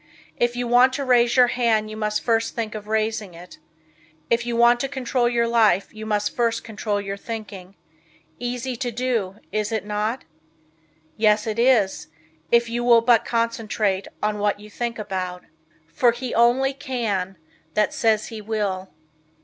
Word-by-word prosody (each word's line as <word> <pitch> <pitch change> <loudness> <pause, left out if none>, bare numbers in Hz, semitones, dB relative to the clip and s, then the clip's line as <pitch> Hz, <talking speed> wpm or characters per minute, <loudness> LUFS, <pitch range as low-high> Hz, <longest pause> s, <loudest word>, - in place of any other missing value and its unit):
If 240 0 +1
you 245 0 -2
want 250 +2 +5
to 280 +1 -3
raise 240 -2 +3
your 250 - +8
hand 220 -3 +1
you - - -6
must 210 -1 -2
first 225 -1 0
think 225 -2 -3
of 210 -1 -7
raising 215 -3 -1
it. 175 +2 -13 0.7
If 235 0 +1
you 240 - -1
want 235 +1 +5
to 275 - -1
control 255 -3 0
your 235 -1 +1
life 220 -5 +2
you 220 0 -8
must 210 -1 -1
first 230 -1 0
control 210 -1 -3
your 200 0 -5
thinking. 200 -4 -8 0.6
Easy 245 +1 -3
to 245 - -2
do, 230 -5 -1 0.2
is 210 +1 -1
it 220 -3 -2
not? 210 +4 -2 0.9
Yes 210 -1 +3
it 220 0 -3
is, 235 -6 +2 0.4
if 235 0 +4
you 240 +1 -2
will 235 -1 +6
but 235 -1 +4
concentrate 220 -4 -1 0.2
on 210 0 0
what 205 0 0
you 210 0 -13
think 235 +1 -3
about. 185 -4 -4 0.5
For 245 -2 +4
he 245 +1 -5
only 245 +4 +3
can 220 -9 -3 0.4
That 210 0 +2
says 220 -2 +1
he 220 -2 -7
will. 200 -3 -2
225 Hz, 165 wpm, -23 LUFS, 210-240 Hz, 0.9 s, your